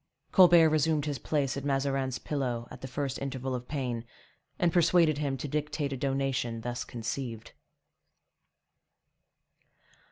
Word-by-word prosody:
Colbert 175 -4 +7
resumed 155 -1 +2
his 145 -4 -3
place 140 0 0
at 140 - -4
Mazarin's 135 -2 0
pillow 125 -5 -3
at - - -10
the 130 - -5
first 135 0 -3
interval 130 -1 -3
of 125 -1 -4
pain, 125 -5 -3 0.5
and 170 -2 +2
persuaded 170 -3 +4
him 140 -2 -1
to 140 - -4
dictate 150 0 -2
a - - -2
donation 135 -3 -1
thus 120 +1 -3
conceived. 115 0 -5
135 Hz, 130 wpm, -29 LUFS, 125-150 Hz, 0.5 s, Colbert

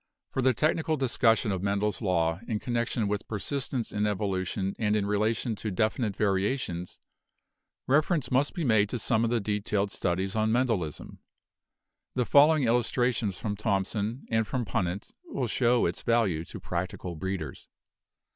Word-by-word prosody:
For 135 - -1
the 130 -1 +3
technical 155 +3 +1
discussion 120 -4 +2
of 95 -2 -2
Mendel's 100 +2 0
law 85 -4 +1
in 110 -3 -1
connection 120 -2 -1
with 105 0 -2
persistence 125 +3 -2
in 105 0 0
evolution 95 -1 -1
and 105 -1 +2
in 105 -2 +1
relation 110 +3 0
to 110 - -3
definite 110 +2 0
varia 100 +4 +1
tions, 90 -7 -6 0.9
reference 150 +2 +2
must 135 +3 +2
be 170 - -2
made 110 -6 +3
to 125 - -2
some 110 0 +1
of 115 - +1
the 120 0 +1
detailed 105 -1 -1
studies 95 +2 -1
on 110 0 +2
Mendelism. 115 - -1 1.0
The 125 -1 +1
following 150 +2 +6
illustrations 120 -3 +1
from 105 +2 -3
Thomson 105 +3 -1
and 110 -1 +2
from 125 0 -2
Punnett 95 0 -2
will 300 - -2
show 120 +1 +2
its 85 - -2
value 105 -9 +1
to - - -9
prac 90 +1 -2
tical 90 -3 -7
breeders. 90 -4 -5
110 Hz, 155 wpm, -28 LUFS, 95-120 Hz, 1.0 s, following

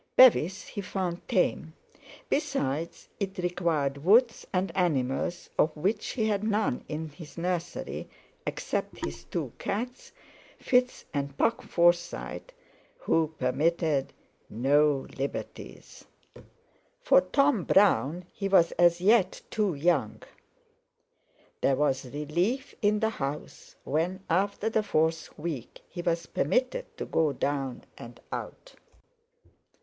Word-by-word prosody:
Bevis 205 -7 +6
he 205 - -6
found 180 -2 -3
tame; 160 -3 0 0.5
besides, 170 - -2
it 195 -1 -3
required 170 -6 0
woods 230 +6 +4
and 185 -2 -1
animals, 165 -1 0
of 155 0 +2
which 200 +7 0
he 225 -4 0
had 205 -1 0
none 215 - 0
in 160 +1 -4
his 150 +2 -12
nursery, 175 0 -3 0.4
except - - -3
his 70 0 -7
two 140 - -4
cats, 245 +6 -4 0.5
Fitz 250 0 +1
and 140 -1 -3
Puck 230 - +2
Forsyte, 175 - 0 0.5
who 165 - 0
permitted 150 +2 +1 0.4
no 140 +4 +2
liberties. 140 +1 -6 1.0
For - - +6
Tom 275 - +2
Brown 180 -4 +3
he 195 - -3
was 190 -4 +5
as 175 0 +5
yet 200 -1 +3
too 205 -6 +1
young. 140 -7 +1 1.4
There 135 - +3
was 135 -3 0
relief 175 - -1
in 210 0 +2
the 220 0 +2
house 145 -5 -6
when, 170 +6 -1
after 200 +4 +1
the 220 -1 +2
fourth 160 -5 0
week, 150 -6 -5
he 175 - -6
was 170 -1 0
permitted 255 - -1
to - - -4
go 155 -3 +1
down 135 -1 -2 0.2
and 120 0 -10
out. - - -7
170 Hz, 115 wpm, -28 LUFS, 150-205 Hz, 1.4 s, Bevis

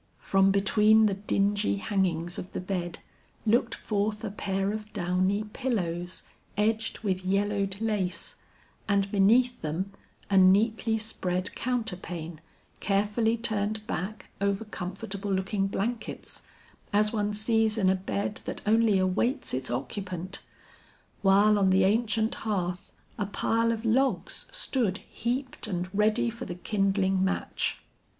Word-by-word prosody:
From 195 0 +3
between 210 +2 +5
the 205 - +2
dingy 205 +1 +1
hangings 180 -4 -1
of 180 - -8
the - - -2
bed, 180 -2 -3 0.5
looked 230 +2 +2
forth 210 +1 -2
a 215 - -3
pair 195 -1 -1
of 215 0 -6
downy 185 +2 +1
pillows, 185 -7 -3 0.3
edged 220 +2 +1
with 190 -3 -1
yellowed 200 0 0
lace, 200 -6 -2 0.5
and 200 -1 +2
beneath 235 +5 +4
them 170 +6 -3 0.4
a 195 -1 +4
neatly 215 +4 +4
spread 185 -4 -2
counterpane 180 -9 -3 0.4
carefully 210 +3 +1
turned 215 -1 -1
back 215 -2 -5
over 200 +2 0
comfortable 200 +1 -5
looking 195 +1 0
blankets, 220 +4 -4 0.5
as 210 +1 +3
one 210 -1 0
sees 220 +1 +1
in 195 -4 +2
a 190 - +5
bed 200 +2 -3
that - - -5
only 220 -1 +4
awaits 190 +9 0
its 130 0 -1
occupant; 180 +9 -4 0.8
while 205 +2 +5
on 195 -1 +4
the 190 0 +4
ancient 220 +2 +2
hearth, 180 -5 -2 0.3
a 200 - 0
pile 230 +3 +1
of 230 0 -3
logs 260 +4 +1
stood 250 - +1
heaped 250 +1 -2
and 180 -1 -3
ready 215 +3 +3
for 235 +2 -7
the 175 - -5
kindling 195 0 +1
match. 190 - -1
200 Hz, 130 wpm, -28 LUFS, 190-220 Hz, 0.8 s, between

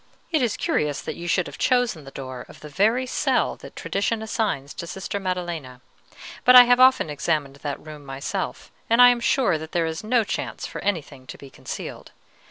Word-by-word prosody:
"It 315 -4 +2
is 235 -4 0
curious 150 -2 0
that - - -5
you 175 - -7
should 180 0 +1
have - - -10
chosen 245 - +1
the - - -9
door 130 -2 -7
of - - -14
the 150 - -9
very 220 - +2
cell 255 - 0
that - - -12
tradition 215 +3 -2
assigns 210 - -2
to 170 - -7
Sister 190 +3 -4
Maddelena; 175 -9 -4 0.6
but 250 - +7
I 250 - +12
have 245 0 +4
often 260 -7 +6
examined 145 -2 -1
that 140 -1 -5
room 150 -1 -11
myself, 135 0 -5 0.2
and 230 +1 +3
I 245 0 +10
am 245 -1 +2
sure 235 - +2
that 160 0 -9
there 170 -1 +1
is 160 +3 -4
no 230 +1 +2
chance - - -4
for - - -7
anything 155 -9 -3
to - - -9
be 140 -1 -13
concealed. - - -8
175 Hz, 200 wpm, -24 LUFS, 145-230 Hz, 0.6 s, I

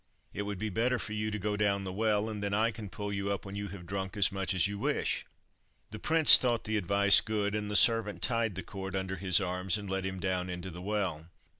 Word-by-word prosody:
It 100 - -4
would 100 -1 -4
be 110 +2 -4
better 120 +5 0
for 105 0 -5
you 110 0 -2
to 105 - -4
go 105 +1 -2
down 100 -1 0
the 95 -1 -6
well, 105 +1 0
and 105 -2 -5
then 100 0 -2
I 115 +2 +1
can 105 -3 -9
pull 100 +2 -5
you 100 0 -2
up 100 - -4
when 100 0 -8
you 100 0 -4
have 95 -2 -10
drunk 95 +2 -5
as 100 0 +4
much 95 -1 -2
as 95 - +3
you 100 0 -6
wish." - - -2 0.6
The 110 - -7
prince 160 +2 +8
thought 120 -3 0
the 110 - -3
advice 100 0 +4
good, 105 -2 -2
and 105 -1 -3
the 105 - -3
servant 115 -1 +3
tied 115 -5 0
the 95 - -5
cord 95 0 -7
under 95 0 -3
his 95 +1 +2
arms, 90 0 -1
and 105 -1 -8
let 95 0 -3
him 95 0 -4
down 90 -1 -2
into 90 +1 -6
the 90 +2 -9
well. 90 -5 -3
100 Hz, 255 wpm, -30 LUFS, 95-105 Hz, 0.6 s, prince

